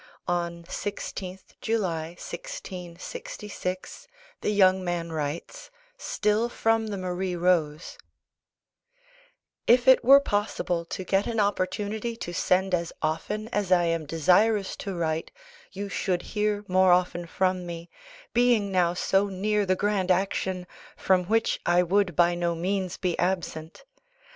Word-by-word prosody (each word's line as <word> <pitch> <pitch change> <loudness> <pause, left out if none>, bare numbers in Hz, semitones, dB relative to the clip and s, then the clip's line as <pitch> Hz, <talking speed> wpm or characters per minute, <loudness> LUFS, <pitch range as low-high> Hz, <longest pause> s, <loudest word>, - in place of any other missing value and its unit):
On 170 -1 -2
16th 190 0 -6
July 175 -7 -1
1666 210 - -7 0.3
the - - 0
young 190 -2 +4
man 175 -2 -2
writes 160 - -5 0.3
still 220 - 0
from 225 -1 +1
the 205 -2 -4
Marie 185 0 -2
Rose 170 -3 0 1.7
If 245 +2 +5
it 260 - +7
were 275 +3 +9
possible 205 -8 -1
to 185 - -5
get 195 +2 +1
an 230 -2 -1
opportunity 205 +3 -1
to 175 -6 -6
send 185 +2 +1
as 170 -1 0
often 205 +8 -2
as 205 -5 -2
I 175 -1 +5
am 165 -2 -1
desirous 190 +6 +3
to 195 -2 -5
write, 160 -1 -1 0.4
you 200 +1 -5
should 185 -2 -1
hear 210 -1 0
more 185 0 +4
often 175 -1 +1
from 185 0 0
me, 170 0 -7 0.5
being 235 -4 +3
now 175 -2 +2
so 195 +2 +2
near 205 +1 0
the 185 - +3
grand 200 -1 0
action, 185 0 0 0.3
from 185 -1 +2
which 225 +4 +1
I 175 +1 +3
would 185 -1 +1
by 175 0 +4
no 175 -1 -1
means 185 +1 -2
be 180 -2 -1
absent. 175 -3 -2
185 Hz, 135 wpm, -26 LUFS, 175-210 Hz, 1.7 s, were